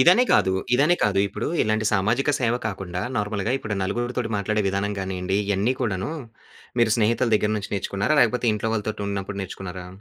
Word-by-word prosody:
ఇదనే 180 - +7
కాదు. 95 - +4 0.2
ఇదనే 150 +7 +4
కాదు, 100 -2 +2
ఇప్పుడు 105 +4 -4 0.2
ఇలాంటి 110 0 0
సామాజిక 110 +8 +2
సేవ 120 -1 +2
కాకుండా 95 -3 -4 0.2
నార్మల్‌గా 105 +2 -1
ఇప్పుడు 110 -5 -4
నలుగురితోటి 120 +4 -2
మాట్లాడే 105 +1 0
విధానం 100 +2 -1
గానియండి 95 0 -2
ఇయన్ని 100 +5 +1
కూడాను, 95 +1 -1 0.7
మీరు 110 -2 +4
స్నేహితుల 115 +2 +2
దెగ్గర 105 0 0
నుంచి 100 -1 -5
నేర్చుకున్నారా? 100 +9 0
లేకపోతే 120 +1 +1
ఇంట్లో 110 +1 -2
వాళ్ళతోటి 110 -1 -3
ఉన్నప్పుడు 100 0 -4
నేర్చుకున్నారా? 90 -1 -7
105 Hz, 160 wpm, -24 LUFS, 95-115 Hz, 0.7 s, ఇదనే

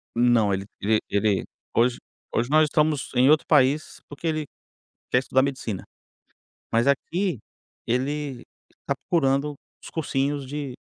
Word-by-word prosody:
Não, 115 -4 +4
ele 95 +1 -2
e 110 +1 +2
ele, 100 -1 +1 0.3
hoje 120 +1 +3 0.3
hoje 120 - 0
nós 155 +1 +5
estamos 150 -1 +1
em 130 +2 +5
outro 155 - +3
país, 145 0 +3
porque 145 +3 -6
ele 155 -1 -1 0.7
quer - - +4
estudar 130 0 +2
medicina. 130 -8 -3 0.9
Mas 115 +2 +2
aqui, 170 - 0 0.5
ele 135 +1 -2 0.3
está - - -4 0.2
procurando 145 -2 +2 0.3
os - - -10
cursinhos 145 -2 -1
de 140 -2 -5
135 Hz, 130 wpm, -25 LUFS, 120-150 Hz, 0.9 s, nós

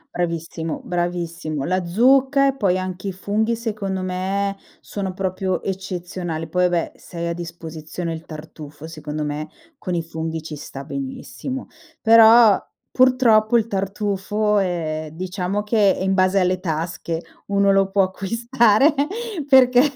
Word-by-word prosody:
Bravissimo, 165 -2 -3
bravissimo. 175 -4 -3
La 185 +1 0
zucca 265 +8 +4
e 270 - -2
poi 195 -8 +1
anche 185 +1 -5
i - - -1
funghi 210 +5 -1
secondo 210 -5 -3
me 195 +2 -1 0.2
sono 195 -2 -4
proprio 185 0 -2
eccezionali. 180 -3 -4
Poi 180 +3 +1
vabbè, 170 -2 -1
se 170 - -13
hai 170 - -2
a - - -1
disposizione 165 0 -6
il 160 0 -7
tartufo, 155 -1 -10
secondo 155 -1 -5
me 150 +1 -4 0.3
con 180 -2 -3
i 165 - -1
funghi 160 -1 -5
ci 155 -1 -6
sta 140 -1 -8
benissimo, 265 - -6 0.3
però 225 -1 +7 0.3
purtroppo 240 -3 +4
il 225 - +1
tartufo, 200 0 -3 0.2
uhm, 160 -4 -2
diciamo 185 +4 -3
che 210 -2 +3
è - - -5
in 190 0 +1
base 185 +1 +3
alle 185 0 +1
tasche, 165 -1 -3 0.3
uno 200 0 +3
lo 195 0 +3
può 195 0 +3
acquistare 230 - +2 0.6
perché 250 -2 +7
185 Hz, 140 wpm, -21 LUFS, 170-210 Hz, 0.6 s, però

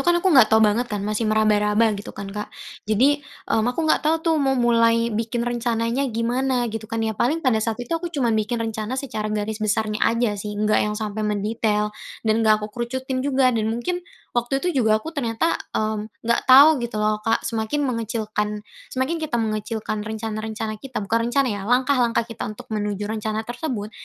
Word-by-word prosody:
kan 350 0 +3
aku 360 0 +2
nggak 255 -6 +7
tahu 220 0 +5
banget 220 +4 +2
kan, 205 -3 -3
masih 215 +1 -1
meraba-raba, 215 0 +3
gitu 205 0 -6
kan, 200 - -5
Kak, 210 0 -5 0.4
jadi 265 +7 +3 0.3
aku 245 +7 +1
nggak 315 - +3
tahu 315 +2 +2
tuh 330 - +3
mau 270 -1 +2
mulai 230 -1 +3
bikin 230 +2 -1
rencananya 240 +2 0
gimana, 245 +2 0
gitu 220 -1 -6
kan, 225 -1 -1
ya. 220 - 0
Paling 290 +10 0
pada 225 -4 +3
saat 225 0 -1
itu 245 - -6
aku 340 +1 -1
cuman 270 -8 0
bikin 220 +2 0
rencana 220 +2 -3
secara 215 -6 -3
garis 215 +1 -3
besarnya 215 0 0
aja 230 -1 +1
sih, 210 0 -5
nggak 215 +1 +2
yang 210 - -2
sampai 215 -1 -4
mendetail 210 0 0 0.3
dan 220 +1 +2
nggak 215 -1 +3
aku 210 - -8
kerucutin 255 +3 -3
juga 265 -1 +2
dan 220 -2 0
mungkin 240 +11 -2 0.3
waktu 240 +3 0
itu 325 -3 0
juga 215 -1 +4
aku, 315 +10 -6
mmm, - - -30
ternyata 230 +4 0 0.8
nggak 235 +1 +2
tahu, 270 +4 +10
gitu 235 -2 -4
loh, 215 0 +1
Kak, 225 +1 0
semakin 230 +5 -1
mengecilkan 215 -2 -3 0.2
semakin 270 +6 -2
kita 310 -5 -1
mengecilkan 215 -1 -2
rencana-rencana 220 0 -4
kita, 270 -2 -5
bukan 230 +3 0
rencana 275 +1 +2
ya, 200 - -5
langkah-langkah 250 -1 +2
kita 230 -2 -7
untuk 215 - -10
menuju 205 -1 -2
rencana 220 0 -2
tersebut, 240 -4 -4
225 Hz, 185 wpm, -23 LUFS, 215-250 Hz, 0.8 s, tahu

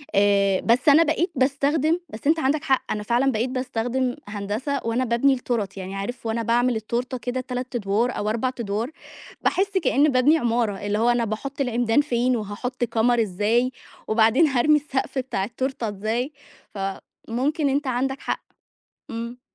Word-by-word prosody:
آآ. 200 -1 +3
بس 245 +5 +3
أنا 305 +3 +7
بقيت 330 +3 0
باستخدم 285 +5 +2
بس 220 +6 -6
أنت 320 +2 +4
عندك 290 +1 +1
حق، 265 -4 0
أنا 210 - -2
فعلًا 245 +5 +2
بقيت 235 +2 -1
باستخدم 255 0 -1
هندسة 210 +7 -3
وأنا 235 +3 0
بابني 240 +4 +3
التورت. 230 -6 -2
يعني 190 0 -6
عارف 235 +5 -5
وأنا 225 +1 -1
باعمل 240 +2 +2
التورتة 240 +4 -2
كده 250 +1 -3
3 255 0 -5
أدوار 225 +3 0
أو 210 - -1
4 235 +4 0
أدوار، 220 +4 -2 0.5
باحس 385 +2 +1
كإنّي 305 -4 +3
بابني 275 +4 +4
عمارة، 230 -6 0
اللي 205 0 0
هو 235 +2 +3
أنا 240 -1 +2
باحط 270 +7 -4
العمدان 245 0 +2
فين، 250 -3 +1
وهاحط 230 +5 -4
كَمَر 235 +1 +2
إزاي، 220 +5 +1 0.4
وبعدين 225 +8 +4
هارمي 280 +2 +3
السقف 275 -1 -3
بتاع 255 -7 -1
التورتة 240 +2 -3
إزاي، 220 +7 -2 1.0
فممكن 280 +6 0
أنت 280 +1 0
عندك 265 +2 -1
حق. - - -3 0.7
إمم. 235 +1 -6
245 Hz, 160 wpm, -24 LUFS, 220-270 Hz, 1.0 s, أنا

